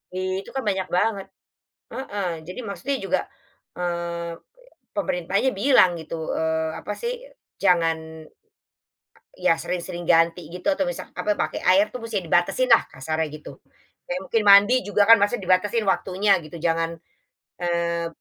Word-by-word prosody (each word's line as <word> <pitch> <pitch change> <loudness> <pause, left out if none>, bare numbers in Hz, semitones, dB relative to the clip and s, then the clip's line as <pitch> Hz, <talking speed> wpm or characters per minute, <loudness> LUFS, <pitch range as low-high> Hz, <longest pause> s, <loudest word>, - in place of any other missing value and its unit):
I 185 0 -2
itu - - -13
kan 270 - -2
banyak 190 -3 -1
banget, 195 +2 0 0.6
heeh, 205 -8 -4 0.2
jadi 180 - -7
maksudnya 230 +6 -3
juga, - - +1 0.6
eee, 170 -1 -4 0.6
pemerintahnya 200 - 0
bilang 195 -7 +4
gitu, 160 0 -5
eee, 160 0 -1
apa 210 - -5
sih 480 - -4 0.4
jangan 160 -2 0 1.1
Ya 165 - +2
sering-sering 175 -1 -5
ganti 165 0 +3
gitu 180 +2 -10
atau 285 -1 0
misal 265 - -6
apa 210 -1 -1
pakai 155 -4 -2
air 195 +3 +4
tuh 250 - -6
musti 225 -4 -3
dibatasin 175 +9 +1
lah 230 - +6
kasarnya 160 +4 -3
gitu, 150 -3 -11 0.5
kayak 180 - -2
mungkin 225 +3 +1
mandi 200 +4 +8
juga 205 0 +3
kan 230 - +9
maksudnya 205 +1 +1
dibatasin 200 +5 +2
waktunya 195 +1 +1
gitu 155 +1 -11
jangan, 165 0 0 0.6
eee, 170 -1 -1
180 Hz, 140 wpm, -23 LUFS, 170-205 Hz, 1.1 s, kan